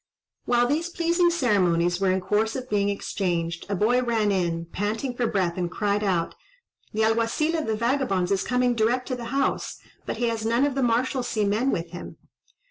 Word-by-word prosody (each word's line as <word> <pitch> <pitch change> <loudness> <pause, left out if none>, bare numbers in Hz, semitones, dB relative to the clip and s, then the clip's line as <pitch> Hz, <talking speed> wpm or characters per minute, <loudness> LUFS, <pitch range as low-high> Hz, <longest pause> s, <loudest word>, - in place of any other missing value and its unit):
While 240 0 +3
these 310 +7 0
pleasing 345 0 +2
ceremonies 185 - +2
were 195 - +3
in 185 0 +1
course 210 +4 0
of 255 -3 -6
being 200 -1 +2
exchanged, 170 -4 -2
a 200 - 0
boy 235 +6 +2
ran 225 -4 +1
in, 170 -3 -1
panting 215 +8 -3
for 240 -1 0
breath, 185 -5 0
and 175 -1 -1
cried 205 +2 -1
out, 180 -4 0 0.6
"The 220 +1 0
Alguazil 230 +9 +1
of 315 -5 -2
the 220 - 0
vagabonds 230 -6 0
is 195 -1 +2
coming 250 0 +1
direct 240 +3 +1
to 255 - -1
the 240 -1 -7
house, 275 +3 -1 0.3
but - - -3
he 240 - 0
has 225 -1 -3
none 235 +4 +2
of 285 - 0
the 270 - -1
Marshalsea 245 -2 0
men 215 +6 +1
with 170 -7 -2
him." 175 - -8
220 Hz, 195 wpm, -25 LUFS, 190-250 Hz, 0.6 s, While